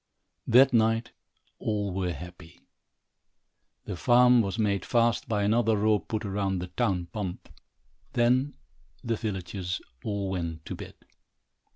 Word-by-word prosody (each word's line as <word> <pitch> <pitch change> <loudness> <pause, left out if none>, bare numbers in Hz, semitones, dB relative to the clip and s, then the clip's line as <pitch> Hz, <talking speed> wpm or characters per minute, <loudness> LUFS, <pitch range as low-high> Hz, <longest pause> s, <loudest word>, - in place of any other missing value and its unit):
That 130 +2 +6
night 115 0 +2 0.5
all 105 -3 -2
were 90 -1 -1
happy. 90 -1 -11 1.2
The - - -4
farm 125 +6 +5
was 100 0 -3
made 100 -3 +1
fast 120 -2 +1
by 105 -2 +1
another 110 +1 +2
rope 105 0 +1
put 110 0 -2
round 95 -1 -1
the 90 0 -5
town 95 -3 0
pump. 100 -5 -5 0.7
Then 125 +4 +2 0.5
the 115 -1 0
villagers 95 -3 -4 0.2
all 100 -3 -2
went 85 -4 -4
to - - -5
bed. - - -9
105 Hz, 130 wpm, -28 LUFS, 90-115 Hz, 1.2 s, That